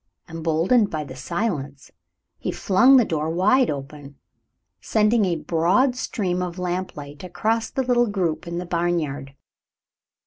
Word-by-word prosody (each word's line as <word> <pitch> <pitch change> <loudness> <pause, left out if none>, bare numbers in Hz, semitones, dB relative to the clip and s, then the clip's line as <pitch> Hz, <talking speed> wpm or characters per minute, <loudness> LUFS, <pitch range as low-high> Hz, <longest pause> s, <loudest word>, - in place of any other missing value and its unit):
Emboldened 165 +7 +1
by 155 -1 -3
the 130 -3 -10
silence, 145 - -4 0.5
he - - -3
flung 245 +8 +5
the 245 - +4
door 155 -3 -2
wide 210 +10 +3
open, 140 0 -7 0.6
sending 215 0 +2
a 175 -2 0
broad 180 - +1
stream 185 -8 -2
of 180 -1 -4
lamplight 175 -5 -5
across 220 +5 -1
the 265 - -2
little 240 -1 +2
group 175 -5 -2
in 170 0 -4
the 180 - -4
barnyard. 165 -6 -2
175 Hz, 135 wpm, -23 LUFS, 155-210 Hz, 0.6 s, flung